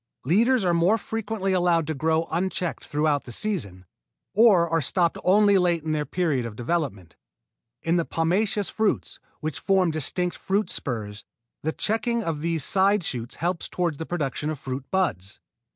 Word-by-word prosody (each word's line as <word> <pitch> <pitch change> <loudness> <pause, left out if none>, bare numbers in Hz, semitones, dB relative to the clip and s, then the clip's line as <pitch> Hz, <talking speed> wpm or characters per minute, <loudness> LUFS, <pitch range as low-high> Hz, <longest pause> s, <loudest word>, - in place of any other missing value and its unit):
Leaders 225 - +3
are 175 - +3
more 175 +6 +3
frequently 220 -3 -2
allowed 175 -3 +2
to 160 - -2
grow 160 +3 0
unchecked 180 0 -2
throughout 150 -1 0
the 120 - -8
season, 110 - -3 0.5
or 200 -6 +5
are 165 0 +1
stopped 170 +4 +1
only 200 +1 +5
late 175 -3 +1
in 160 - -2
their 150 -2 -1
period 155 -6 0
of 115 -2 -6
development. 120 - -3 0.7
In 165 +2 +2
the 170 - +2
pomaceous 195 +5 0
fruits, 220 -1 -1 0.2
which 155 -2 -3
form 190 -3 +2
distinct 175 +4 0
fruit 200 +2 -1
spurs, 110 -5 -4 0.4
the 160 - -1
checking 230 +5 0
of 165 -5 -2
these 165 -2 -1
side 195 +3 +3
shoots 120 -5 -4
helps 175 0 -2
toward 170 -5 -1
the 160 - -5
production 150 -3 -2
of 155 - -3
fruit 130 0 -6
buds. 160 - -1
170 Hz, 165 wpm, -25 LUFS, 150-190 Hz, 0.7 s, or